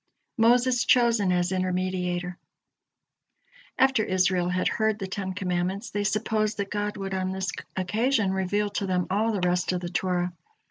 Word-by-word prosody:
MOSES 245 Hz, +2 st, +4 dB
CHOSEN 235 Hz, -6 st, +4 dB
AS 180 Hz, 0 st, +1 dB
INTERMEDIATOR 180 Hz, -1 st, -1 dB, 1.4 s
After 265 Hz, -3 st, +3 dB
Israel 185 Hz, -2 st, +1 dB
had 180 Hz, +1 st, 0 dB
heard 220 Hz, -1 st, +1 dB
the 195 Hz, -, -4 dB
Ten 190 Hz, 0 st, -4 dB
Commandments, 185 Hz, +2 st, -2 dB
they 205 Hz, 0 st, -1 dB
supposed 215 Hz, +1 st, 0 dB
that 200 Hz, -1 st, -3 dB
God 205 Hz, 0 st, -2 dB
would 195 Hz, -1 st, -4 dB
on 185 Hz, 0 st, -1 dB
this 190 Hz, -1 st, -2 dB, 0.2 s
occasion 215 Hz, +3 st, +1 dB
reveal 205 Hz, +2 st, 0 dB
to 200 Hz, -1 st, -2 dB
them 180 Hz, -1 st, 0 dB
all 215 Hz, +4 st, +2 dB
the 190 Hz, -4 st, 0 dB
rest 180 Hz, +1 st, +1 dB
of 180 Hz, -, -1 dB
the 175 Hz, -, -4 dB
Torah. 180 Hz, 0 st, -1 dB
190 Hz, 155 wpm, -26 LUFS, 180-215 Hz, 1.4 s, MOSES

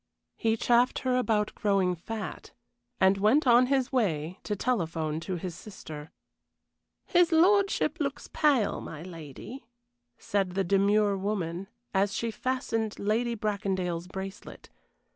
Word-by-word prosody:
He 225 Hz, 0 st, +1 dB
chaffed 240 Hz, +2 st, +3 dB
her 255 Hz, -1 st, +2 dB
about 220 Hz, -4 st, +1 dB
growing 195 Hz, -3 st, +1 dB
fat, 210 Hz, +6 st, -7 dB, 0.5 s
and 190 Hz, +1 st, +4 dB
went 240 Hz, +10 st, +4 dB
on 245 Hz, 0 st, +6 dB
his 265 Hz, -1 st, +1 dB
way 180 Hz, -, 0 dB
to 210 Hz, -, -1 dB
telephone 165 Hz, -9 st, -1 dB
to 180 Hz, +3 st, -4 dB
his 180 Hz, 0 st, -5 dB
sister. 160 Hz, -6 st, -9 dB, 1.0 s
"His 350 Hz, -2 st, +3 dB
lordship 390 Hz, +4 st, +3 dB
looks 280 Hz, -2 st, -3 dB
pale, 280 Hz, -9 st, +2 dB
my 155 Hz, 0 st, -8 dB
lady," 170 Hz, -, -9 dB, 0.5 s
said 195 Hz, -3 st, -1 dB
the 195 Hz, -, +2 dB
demure 200 Hz, +2 st, +3 dB
woman, 190 Hz, -2 st, -3 dB, 0.3 s
as 195 Hz, 0 st, +1 dB
she 230 Hz, -1 st, -1 dB
fastened 225 Hz, -3 st, -2 dB
Lady 230 Hz, +3 st, 0 dB
Bracondale's 190 Hz, -5 st, -2 dB
bracelet. 190 Hz, +2 st, -8 dB
205 Hz, 125 wpm, -28 LUFS, 185-240 Hz, 1.0 s, on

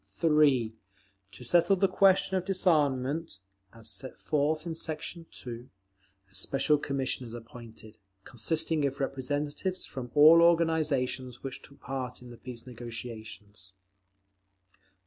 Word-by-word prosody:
3. 130 Hz, -, +2 dB, 0.6 s
To 100 Hz, -, -11 dB
settle 175 Hz, -, +4 dB
the 195 Hz, +1 st, +3 dB
question 190 Hz, 0 st, +3 dB
of 185 Hz, -, 0 dB
disarmament, 155 Hz, -, +1 dB, 0.3 s
as 115 Hz, -1 st, -12 dB
set 130 Hz, +2 st, -3 dB
forth 155 Hz, +2 st, 0 dB
in 170 Hz, -, -3 dB
section 160 Hz, +1 st, -5 dB
2, 120 Hz, 0 st, -8 dB, 0.6 s
a -, -, -25 dB
special 135 Hz, +9 st, +1 dB
commission 135 Hz, -3 st, -2 dB
is 115 Hz, -, -8 dB
appointed, 115 Hz, -2 st, -12 dB, 0.2 s
consisting 155 Hz, +7 st, 0 dB
of 140 Hz, 0 st, -6 dB
representatives 145 Hz, +7 st, -2 dB
from 125 Hz, -2 st, -7 dB
all 155 Hz, +3 st, +8 dB
organisations 150 Hz, -7 st, +1 dB
which 135 Hz, -1 st, -6 dB
took 140 Hz, -, -16 dB
part 130 Hz, -1 st, -5 dB
in 125 Hz, -, -11 dB
the 120 Hz, -, -11 dB
peace 125 Hz, -1 st, -9 dB
negotiations. 110 Hz, -5 st, -9 dB
135 Hz, 125 wpm, -29 LUFS, 120-160 Hz, 0.6 s, all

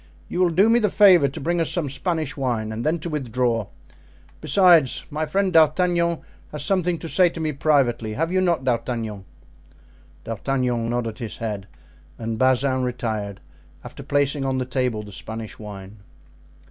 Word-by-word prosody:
You 175 Hz, -, -3 dB
will 180 Hz, -1 st, +4 dB
do 185 Hz, +6 st, +4 dB
me 230 Hz, +1 st, +4 dB
the 210 Hz, -3 st, +2 dB
favor 185 Hz, -8 st, +6 dB
to 135 Hz, -, -7 dB
bring 170 Hz, +4 st, 0 dB
us 165 Hz, -, 0 dB
some 170 Hz, -5 st, -2 dB
Spanish 155 Hz, +1 st, -2 dB
wine 120 Hz, -6 st, -2 dB
and 110 Hz, +2 st, -4 dB
then 155 Hz, +3 st, +1 dB
to 170 Hz, -, -4 dB
withdraw. 120 Hz, -6 st, -1 dB, 0.7 s
Besides, 170 Hz, -4 st, +4 dB
my 155 Hz, +1 st, -2 dB
friend 190 Hz, +3 st, 0 dB
D'Artagnan 170 Hz, +1 st, +3 dB, 0.3 s
has 150 Hz, -1 st, -3 dB
something 180 Hz, -3 st, +1 dB
to 165 Hz, -, -7 dB
say 180 Hz, +2 st, +4 dB
to 165 Hz, -, -9 dB
me 155 Hz, -1 st, -1 dB
privately, 130 Hz, -6 st, +1 dB
have 165 Hz, +7 st, -1 dB
you 185 Hz, 0 st, +2 dB
not, 170 Hz, -7 st, +1 dB
D'Artagnan?" 115 Hz, -5 st, -2 dB, 1.0 s
D'Artagnan 120 Hz, 0 st, -1 dB
nodded 120 Hz, -1 st, -3 dB
his 115 Hz, -4 st, -6 dB
head 105 Hz, -4 st, -4 dB, 0.5 s
and 115 Hz, -1 st, -4 dB
Bazin 130 Hz, 0 st, +2 dB
retired, 110 Hz, -5 st, -3 dB, 0.4 s
after -, -, -10 dB
placing 145 Hz, 0 st, 0 dB
on 135 Hz, -1 st, -1 dB
the 130 Hz, -, -1 dB
table 125 Hz, -4 st, -1 dB
the 105 Hz, -, -11 dB
Spanish 110 Hz, +3 st, -8 dB
wine. 100 Hz, -1 st, -10 dB
135 Hz, 165 wpm, -23 LUFS, 115-165 Hz, 1.0 s, favor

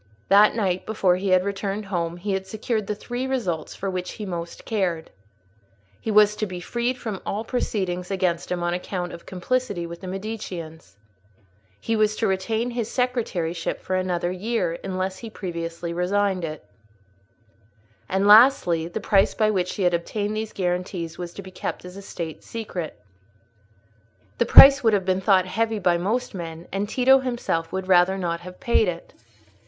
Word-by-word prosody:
That 205 Hz, +2 st, +6 dB
night, 185 Hz, -5 st, -1 dB
before 195 Hz, -5 st, +2 dB
he 185 Hz, -1 st, +3 dB
returned 200 Hz, +2 st, -3 dB
home, 170 Hz, -3 st, -2 dB
he 200 Hz, +3 st, -3 dB
had 190 Hz, 0 st, -3 dB
secured 220 Hz, 0 st, -2 dB
the 210 Hz, -, -2 dB
three 245 Hz, +5 st, -4 dB
results 185 Hz, -, -2 dB
for 195 Hz, -, -4 dB
which 185 Hz, -1 st, -3 dB
he 210 Hz, -, -6 dB
most 170 Hz, -2 st, -6 dB
cared: 185 Hz, -7 st, -1 dB, 0.9 s
he -, -, -5 dB
was 210 Hz, 0 st, +5 dB
to 215 Hz, -, -1 dB
be 180 Hz, -1 st, -6 dB
freed 240 Hz, +7 st, -2 dB
from 215 Hz, -6 st, -5 dB
all 210 Hz, +2 st, -3 dB
proceedings 190 Hz, -7 st, -2 dB
against 185 Hz, -4 st, -1 dB
him 175 Hz, -1 st, -1 dB
on 175 Hz, 0 st, 0 dB
account 180 Hz, 0 st, -4 dB
of 170 Hz, -, -11 dB
complicity 195 Hz, -1 st, -2 dB
with 170 Hz, 0 st, -8 dB
the 190 Hz, -, -7 dB
Mediceans; 180 Hz, -, -6 dB, 0.8 s
he 225 Hz, -, -1 dB
was 215 Hz, 0 st, +2 dB
to 225 Hz, -, -1 dB
retain 220 Hz, +5 st, 0 dB
his 235 Hz, -2 st, -3 dB
secretaryship 195 Hz, -10 st, -1 dB
for 185 Hz, -, -3 dB
another 180 Hz, -1 st, -1 dB
year, 185 Hz, -3 st, -2 dB
unless 185 Hz, 0 st, -3 dB
he 230 Hz, -, -7 dB
previously 170 Hz, -4 st, -5 dB
resigned 190 Hz, +1 st, 0 dB
it; 155 Hz, -2 st, -5 dB, 1.4 s
and, 190 Hz, +1 st, +1 dB
lastly, 205 Hz, -7 st, +6 dB
the 175 Hz, -, -4 dB
price 195 Hz, -2 st, +3 dB
by 215 Hz, -1 st, +2 dB
which 180 Hz, -3 st, -1 dB
he 200 Hz, -, -2 dB
had 175 Hz, -1 st, +3 dB
obtained 205 Hz, +5 st, -2 dB
these 220 Hz, 0 st, -3 dB
guarantees 180 Hz, -2 st, -3 dB
was 175 Hz, -1 st, -5 dB
to 200 Hz, -, -9 dB
be 190 Hz, -, -11 dB
kept 185 Hz, -, -5 dB
as 180 Hz, 0 st, -10 dB
a 200 Hz, -, -8 dB
State 170 Hz, -4 st, -7 dB
secret. 185 Hz, -, -6 dB, 1.4 s
The -, -, +2 dB
price 275 Hz, 0 st, +10 dB
would 225 Hz, -2 st, +4 dB
have 195 Hz, -2 st, +1 dB
been 185 Hz, 0 st, +1 dB
thought 190 Hz, -2 st, +4 dB
heavy 220 Hz, +4 st, -1 dB
by 175 Hz, -3 st, +2 dB
most 220 Hz, +9 st, -1 dB
men; 165 Hz, -2 st, -7 dB
and 200 Hz, +2 st, -2 dB
Tito 265 Hz, +3 st, +5 dB
himself 240 Hz, -10 st, -2 dB
would 190 Hz, 0 st, -3 dB
rather 185 Hz, +1 st, +4 dB
not 170 Hz, -3 st, -2 dB
have 180 Hz, +1 st, -11 dB
paid 235 Hz, -5 st, +2 dB
it. 170 Hz, -1 st, -5 dB
190 Hz, 175 wpm, -24 LUFS, 175-215 Hz, 1.4 s, price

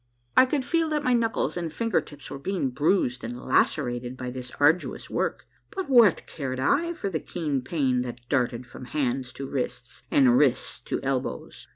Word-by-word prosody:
I 255 Hz, -, +7 dB
could 270 Hz, -1 st, -1 dB
feel 330 Hz, +1 st, +1 dB
that 300 Hz, -1 st, 0 dB
my 255 Hz, -2 st, +3 dB
knuckles 230 Hz, -2 st, +1 dB
and 170 Hz, -2 st, -3 dB
finger 230 Hz, 0 st, +1 dB
tips 145 Hz, -1 st, -12 dB
were 140 Hz, -, -5 dB
being 170 Hz, -4 st, -1 dB
bruised 135 Hz, -2 st, +1 dB
and 120 Hz, +2 st, -5 dB
lacerated 125 Hz, -2 st, 0 dB
by 125 Hz, -1 st, -4 dB
this 125 Hz, -1 st, -6 dB
arduous 150 Hz, +5 st, +2 dB
work, -, -, -1 dB, 0.2 s
but 380 Hz, -8 st, -5 dB
what 230 Hz, -8 st, +6 dB
cared 130 Hz, -4 st, -4 dB
I 310 Hz, -, +2 dB
for 320 Hz, -, -4 dB
the 160 Hz, -, -1 dB
keen 150 Hz, -7 st, -2 dB
pain 130 Hz, -3 st, 0 dB
that 120 Hz, -1 st, -7 dB
darted 125 Hz, -2 st, 0 dB
from 125 Hz, -, -10 dB
hands 130 Hz, -2 st, -1 dB
to 135 Hz, -, -6 dB
wrists, 125 Hz, -2 st, -4 dB
and 130 Hz, -4 st, +5 dB
wrists 135 Hz, -4 st, +1 dB
to -, -, -2 dB
elbows 130 Hz, -, -3 dB
140 Hz, 185 wpm, -26 LUFS, 125-195 Hz, 0.2 s, I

